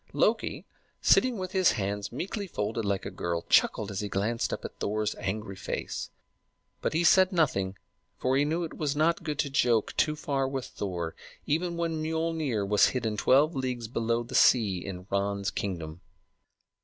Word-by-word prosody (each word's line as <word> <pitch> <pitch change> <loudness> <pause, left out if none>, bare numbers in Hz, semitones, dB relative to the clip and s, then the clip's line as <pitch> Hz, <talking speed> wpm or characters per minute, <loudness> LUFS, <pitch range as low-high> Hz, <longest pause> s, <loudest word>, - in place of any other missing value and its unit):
Loki, - - +1 0.3
sitting 255 -3 +4
with 185 -1 -4
his 185 -2 +4
hands 100 -1 -3
meekly 195 - -4
folded 110 - -2
like 100 -2 -1
a - - -4
girl, 85 -1 -3
chuckled 105 -1 +3
as 95 - -3
he 105 - -3
glanced 105 +5 -1
up - - -4
at - - -8
Thor's 105 0 -1
angry 100 0 -3
face; - - -4 0.7
but - - -1
he 165 +2 +2
said 185 +2 +6
nothing, 100 - +1 0.4
for 130 +1 +1
he 140 - +4
knew 160 +4 0
it 165 - -5
was 145 -2 -1
not 160 +3 +2
good 150 -3 -3
to 140 - -1
joke 120 -5 +2
too 150 0 +2
far 140 -3 -1
with 135 -1 -3
Thor, 85 -5 -4 0.3
even 170 +3 0
when 165 -2 -1
Miölnir 160 -9 -1
was 105 0 +5
hidden 115 -4 -1
twelve 140 +9 +4
leagues 125 -3 -2
below 115 0 0
the 120 - -11
sea 100 -8 +4
in 90 -2 -7
Ran's 100 0 0
kingdom. 85 -5 -4
120 Hz, 175 wpm, -28 LUFS, 100-155 Hz, 0.7 s, said